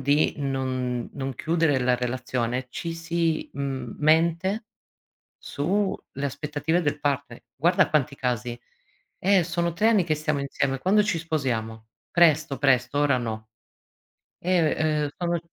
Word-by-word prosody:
di 145 +3 +2
non 130 -3 -2
non 135 -2 -4
chiudere 160 -3 +1
la 125 0 +2
relazione, 125 0 -2
ci 165 +4 -4
si 165 -1 -1
mhmm, 135 -1 -4
mente 170 +7 +2 0.7
su 190 +7 -1 0.2
le 140 +2 -3
aspettative 150 +4 -1
del 150 -1 -1
partner. 140 -4 -2
Guarda 175 +6 +3
quanti 150 -2 +1
casi. 125 -2 -2 0.6
"Eh, 190 -1 +3
sono 170 0 -1
3 215 +5 +3
anni 210 -6 +3
che 155 -2 +1
stiamo 150 -1 -1
insieme, 140 -1 -1
quando 205 +5 +3
ci 200 -5 0
sposiamo?" 115 -9 -2 0.2
"Presto, 155 -4 +3
presto, 135 0 +2
ora 140 -3 +3
no." 110 -2 -5 0.9
Ehm, 155 -4 +1
eh, - - -9
"Sono" 170 -1 0
145 Hz, 135 wpm, -25 LUFS, 130-170 Hz, 0.9 s, Guarda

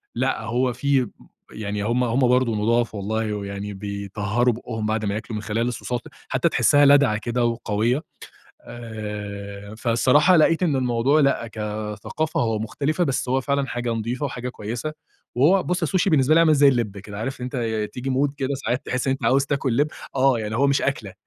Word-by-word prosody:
لأ، 130 -1 0
هو 120 +3 0
في 135 -2 +1 0.4
يعني 105 -1 -4
هم 120 +3 +1
هم 120 +2 0
برضو 125 -2 +2
نُضاف 115 +1 +1
والله 105 +2 -2
ويعني 100 0 -5
بيطهروا 100 +4 -1
بُقهم 110 -2 -5
بعد 110 0 -1
ما 100 - -1
ياكلوا 110 +1 -5
من 105 - -3
خلال 115 +2 -1
الـصوصات 125 0 -3 0.3
حتّى - - +1
تحسها 145 0 +4
لادعة 140 -6 +5
كده 120 +2 -1
وقويّة، 115 +3 0 0.6
آآ، 105 -3 -7
فالصراحة 130 +9 +4
لقيت 165 +3 +3
إن 155 -5 +2
الموضوع 130 +3 +2
لأ 140 -4 +2
كثقافة 105 +7 -4
هو 110 -2 0
مختلفة 145 +9 -1
بس، 135 -4 -1
هو 130 +1 +2
فعلًا 140 0 0
حاجة 120 -1 -2
نضيفة 115 +5 -2
وحاجة 125 -2 -4
كويّسة. 120 +7 -5 0.4
وهو 175 +9 +4
بُص 180 +1 -1
السوشي 185 +3 +1
بالنسبه 150 -1 +4
لي - - +6
عامل 165 -2 +5
زي 145 -1 +5
اللب 120 -7 +1
كده 100 +1 -8
عارف 130 +4 -4
إن - - -3
أنت 110 -4 -2
تيجي 130 +2 -4
مود 135 +2 +1
كده 135 0 -1
ساعات 130 -1 -2
تحس 125 +1 -2
إن - - +3
أنت 135 - -4
عاوز 135 +1 +3
تاكل 135 -4 -1
لب، 145 +2 +3 0.3
آه 130 -2 +3
يعني 110 0 -3
هو 140 +3 +3
مش 140 0 +2
أكله، 110 -8 -2
120 Hz, 185 wpm, -23 LUFS, 110-135 Hz, 0.6 s, لي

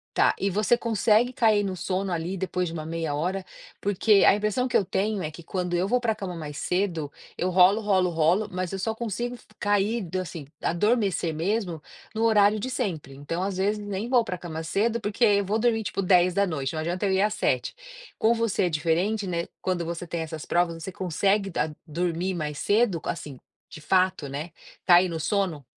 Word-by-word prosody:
Tá. - - +4
E 200 - +1
você 210 +5 +2
consegue 230 +2 +2
cair 220 -4 +3
no 195 -2 -2
sono 190 +2 -2
ali 175 +2 -2
depois 180 0 -2
de - - -8
uma 155 -2 -5
meia 165 -2 -3
hora? 185 +6 -2 0.4
Porque 205 +1 +3
a - - +7
impressão 210 +4 0
que 255 - +2
eu 195 - +1
tenho 200 +3 -1
é 155 - -3
que 165 +2 -12
quando 180 0 -3
eu 180 +3 0
vou 250 - +3
pra 225 -3 0
cama 185 -3 -5
mais 150 -2 -7
cedo, 175 -6 -1 0.3
eu 180 - 0
rolo, 185 +4 +5
rolo, 190 -4 +2
rolo, 170 +6 +2
mas 185 -2 -3
eu 195 - -4
só 220 +4 -2
consigo 235 +2 -3 0.2
cair 205 +1 +1
assim, 170 -6 -5
adormecer 195 -3 +1
mesmo 175 0 -2 0.3
no 225 - 0
horário 210 -2 +4
de 260 - -3
sempre. 180 - -3
Então 150 +6 -4
às 195 -1 -2
vezes 205 +3 +1
nem 205 +2 -3
vou 245 -1 +4
pra 185 -5 -4
cama 165 -2 -6
cedo, 220 +7 0
porque 210 +3 +1
eu 200 -2 +4
vou 210 +3 0
dormir, 225 -1 +2
tipo 195 - -2
22h, 180 -6 +2
não 160 - -4
adianta 175 +5 -2
eu 195 - +1
ir 190 - +2
às 210 +1 +2
19h. - - -1 0.4
Com 225 +2 +3
você 230 -4 0
é 180 - +2
diferente, 175 +7 0
né, 170 -1 -2
quando 180 -2 -1
você 170 +1 -5
tem 165 0 -3
essas 160 -1 -6
provas 170 -1 0
você 185 +3 -6
consegue 195 +3 0
da 160 -3 -1 0.2
dormir 175 +3 -2
mais 150 -4 -4
cedo, 205 -4 +2
assim, 145 -5 -5 0.3
de 155 - -11
fato, 185 -4 +1
né, 150 +5 -5 0.3
cair 180 +1 +6
no 165 -1 -4
sono? 175 -4 -1
185 Hz, 200 wpm, -26 LUFS, 170-210 Hz, 0.4 s, a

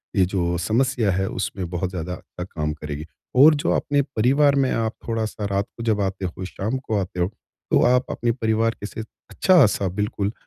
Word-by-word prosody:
ये 95 -3 +4
जो 90 -2 -1
समस्या 115 +3 +1
है 95 +2 0
उसमें 90 -1 -4
बहुत 90 +1 -2
ज़्यादा 90 -1 -4
अच्छा 90 - -8
काम 75 -4 -3
करेगी। 75 0 -6 0.3
और 150 +4 +8
जो 145 - 0
अपने 145 0 +2
परिवार 140 +2 +3
में 135 -2 +2
आप 115 0 0
थोड़ा-सा 110 -2 -2
रात 100 +1 +1
को 115 - -5
जब 110 -3 +1
आते 95 -1 -2
हो, 90 +1 -5
शाम 110 +7 -3
को 115 -5 -2
आते 90 -1 -4
हो, 90 - +2
तो 110 +3 -3
आप 125 +1 +3
अपने 120 - 0
परिवार 115 -1 +1
के - - -4
से 110 - -6 0.3
अच्छा-सा 135 - +4
बिल्कुल 100 +1 -2
105 Hz, 195 wpm, -23 LUFS, 90-120 Hz, 0.3 s, और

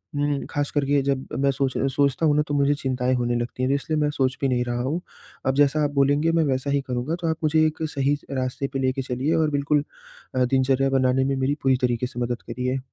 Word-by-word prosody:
उम, 145 -1 0
ख़ास 145 0 -1
कर 145 -2 0
के 140 0 +2
जब 135 -1 -1
मैं 140 0 +3
सोच 135 -1 -1
सोचता 140 +3 +1
हूँ 150 -2 +4
ना 150 - +4
तो 145 - -3
मुझे 140 0 +3
चिंताएँ 130 -2 -1
होने 120 -1 0
लगती 120 +1 -3
हैं 130 - +1
तो - - +3
इसलिए 155 +2 -1
मैं 150 0 +2
सोच 130 -2 0
भी 135 - +2
नहीं 125 -2 +1
रहा 120 0 -2
हूँ, 145 +8 -2 0.4
अब 130 - +1
जैसा 145 +2 +3
आप 145 - 0
बोलेंगे 145 +3 +3
मैं 165 0 +2
वैसा 135 -1 -1
ही 140 0 +2
करूँगा। 125 +5 -2
तो 170 - -1
आप 160 - -1
मुझे 155 +1 +3
एक 155 0 -1
सही 140 +1 +1 0.2
रास्ते 130 +1 -2
पे 135 - -1
लेके 130 0 0
चलिए 130 +4 -1
और 160 -1 +2
बिल्कुल 145 +1 +1 0.5
अ, 130 0 +3
दिनचर्या 135 +1 +2
बनाने 130 -1 +2
में 135 0 0
मेरी 135 +2 0
पूरी 130 -1 +3
तरीके 125 -1 0
से 125 -1 -8
मदद 120 0 -2
करिए। 125 +2 -2
135 Hz, 245 wpm, -24 LUFS, 130-145 Hz, 0.5 s, हूँ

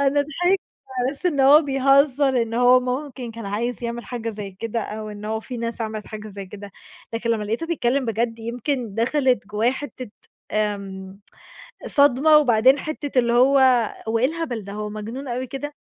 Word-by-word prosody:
أنا 280 +1 +3
ضحِكت 355 +6 0 0.4
على 250 +1 +1
أساس 290 +6 -4
إن 295 -6 +1
هو 285 +4 +7
بيهزّر، 275 -2 +3
إن 230 0 -4
هو 245 +1 +5
ممكن 255 -1 -4
كان 230 -2 -8
عايز 235 +5 -3
يعمل 235 0 -4
حاجة 230 -2 -4
زي 205 -2 -7
كده 230 0 -2
أو 215 0 -6
إن 210 0 -9
هو 220 +1 -2
في 250 +2 -7
ناس 230 0 -4
عملِت 215 -1 -4
حاجة 215 -1 -8
زي 200 -1 -8
كده، 205 +1 -10 0.4
لكن 230 +1 -1
لمّا 220 -2 0
لقيته 225 +10 -2
بيتكلّم 275 -5 0
بجد 230 0 -1
يمكن 235 0 -3
دخلِت 250 -1 +1
جوّايا 210 +3 +1
حِتّة 260 -4 -7 0.4
آمم 195 -2 -3 0.7
صدمة 285 +2 +5
وبعدين 255 -1 +4
حِتّة 290 -4 -3
اللي 235 -1 +3
هو، 260 +3 +5 0.5
هو 225 +1 +1
إيه 245 - +1
الهبل 300 -8 -4
ده؟! 200 - -8
هو 210 0 -4
مجنون 225 +6 -6
أوي 250 +2 -3
كده؟! 290 +3 -6
240 Hz, 180 wpm, -23 LUFS, 220-275 Hz, 0.7 s, هو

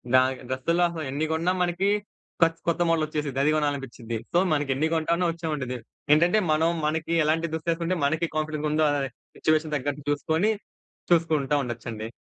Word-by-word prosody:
దానికి 130 0 +3
డ్రెస్సుల్లో 165 +7 +1
అసలు 165 -2 -5
ఎన్ని 145 +3 -1
గొన్నా 165 +3 +1
మనకి 175 +3 +1 0.5
కొత్ 165 0 +4
కొత్త 170 +1 +1
మోడ‌లొచ్చేసిద్ది. 150 -4 0
అది 155 - +4
గొనాలని‌పిచ్చిద్ది. 135 -6 -2 0.2
సో, 175 - +4 0.2
మనకెన్ని 145 +1 +1
గొంటానో 170 +3 +1
ఒచ్చావండిది. 150 -7 -3 0.4
ఏంటంటే 175 +7 +4
మనం 160 +2 +3 0.2
మనకి 160 +2 -1
ఎలాంటి 160 +2 +1
దుస్తే‌సుకుంటే 170 +2 -1
మనకి 155 +3 +1
కాన్ఫిడెన్స్ 155 -1 -1
ఉందా 155 0 +3 0.5
సిట్యుయేషన్ 155 -1 +1
దగ్గట్టు 145 +1 -2
జూసుకొని 160 +8 +1 0.6
చూసుకుంటా 160 -4 +2
ఉండొచ్చండి. 115 -2 -5
155 Hz, 140 wpm, -26 LUFS, 140-165 Hz, 0.6 s, కొత్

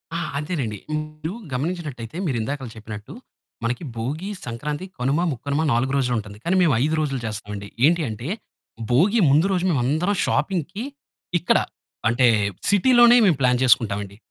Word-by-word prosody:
ఆ! - - -1 0.2
అంతేనండి 140 -8 -3 0.2
మీరు 155 +2 -5 0.2
గమనించినట్టయితే 150 -3 -4
మీరు 135 -7 0
ఇందాక 135 +3 -4
చెప్పినట్టు 110 -1 -8 0.5
మనకి 120 +6 -2
భోగి, 150 - -3 0.2
సంక్రాంతి, 145 +8 -4
కనుమ, 135 +5 +1
ముక్కనుమ 140 +3 -2
4 125 +3 +1
రోజులు 125 -3 +1
ఉంటుంది 105 -1 -9
కానీ 175 - +1
మేము 165 -6 +4
5 155 +2 +1
రోజులు 140 -4 -1
చేస్తామండి. 105 -2 -5 0.2
ఏంటి 170 +2 +4
అంటే, 110 +4 -6 0.6
భోగి 190 - +4
ముందు 150 +5 +4
రోజు 180 -2 +1
మేము 150 -6 +2
అందరం 170 +9 +1
షాపింగ్‌కి 190 +3 -1 0.6
ఇక్కడ 170 - +3 0.5
అంటే, 120 +3 +3 0.4
సిటీ 205 +5 +4
లోనే 240 0 +8
మేము 175 -8 +4
ప్లాన్ 125 -2 +3
చేసుకుంటాం 110 -4 +3
అండి. 100 0 -12
140 Hz, 150 wpm, -23 LUFS, 115-170 Hz, 0.6 s, లోనే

